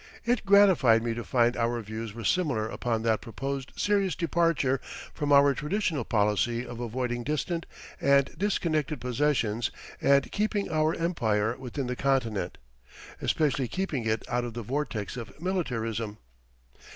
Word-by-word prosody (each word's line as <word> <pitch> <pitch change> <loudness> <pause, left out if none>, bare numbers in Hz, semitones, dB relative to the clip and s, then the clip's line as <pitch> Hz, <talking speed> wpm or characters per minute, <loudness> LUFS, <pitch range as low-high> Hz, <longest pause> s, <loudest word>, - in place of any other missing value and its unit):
It 235 -3 0
gratified 185 - +6
me 115 -1 -1
to 120 +1 -5
find 120 0 +2
our 120 +1 0
views 110 0 -6
were 115 - -6
similar 125 - +1
upon 115 0 -2
that 110 -1 +1
proposed 135 +3 -5
serious 200 -3 +1
departure 165 -5 +1 0.3
from 145 -2 -2
our 140 0 +6
traditional 155 - -1
policy 105 +3 +1
of 120 -1 -8
avoiding 120 0 -2
distant 160 +4 -2 0.3
and 140 0 +4
disconnected 155 -7 0
possessions 125 -4 0 0.3
and 140 0 +3
keeping 205 -2 -1
our 155 0 +2
empire 115 -10 0
within 130 +1 -5
the 125 0 -2
continent, 115 -9 0 0.6
especially 140 -4 +1
keeping 150 - -2
it 110 0 0
out 120 0 0
of 120 -2 -6
the 120 - -4
vortex 125 -4 -3
of 120 +4 -8
militarism. 115 - -2
130 Hz, 140 wpm, -28 LUFS, 115-155 Hz, 0.6 s, gratified